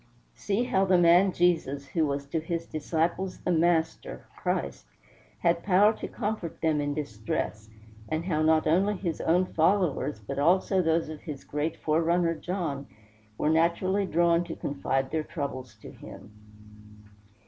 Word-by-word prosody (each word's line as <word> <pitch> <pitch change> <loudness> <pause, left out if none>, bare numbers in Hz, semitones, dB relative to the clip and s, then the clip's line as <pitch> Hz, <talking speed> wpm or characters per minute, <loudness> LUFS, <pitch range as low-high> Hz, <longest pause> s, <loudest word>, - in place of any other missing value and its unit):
See 205 +4 -1
how 195 -6 +1
the 185 -1 +4
man 175 +3 +5
Jesus, 160 -6 +1
who 160 -3 +1
was 140 0 -3
to 160 - -1
his 165 +1 -4
disciples 170 +4 -2
the 180 - -2
Master, 165 -1 0
Christ, 70 -1 -3 0.5
had 170 0 +2
power 205 +3 +4
to - - -5
comfort 210 -7 -4
them 155 -2 +1
in 145 0 -2
distress, 110 -5 -4 0.4
and 160 +1 -2
how 160 -4 0
not 155 0 +3
only 190 +6 +2
his 175 -4 -3
own 180 +3 +2
followers, 165 - +1
but 135 +7 -5
also 185 +5 +3
those 165 -1 +1
of 155 -1 -8
his 150 -5 -7
great 150 +2 -3
forerunner, 165 +2 +1
John, 160 -5 -4 0.5
were 150 - +1
naturally 180 +5 +1
drawn 170 0 +3
to 165 - -6
confide 135 -1 -2
their 160 - 0
troubles 140 - -6
to - - -9
him. 105 - -12
165 Hz, 150 wpm, -27 LUFS, 150-180 Hz, 0.5 s, man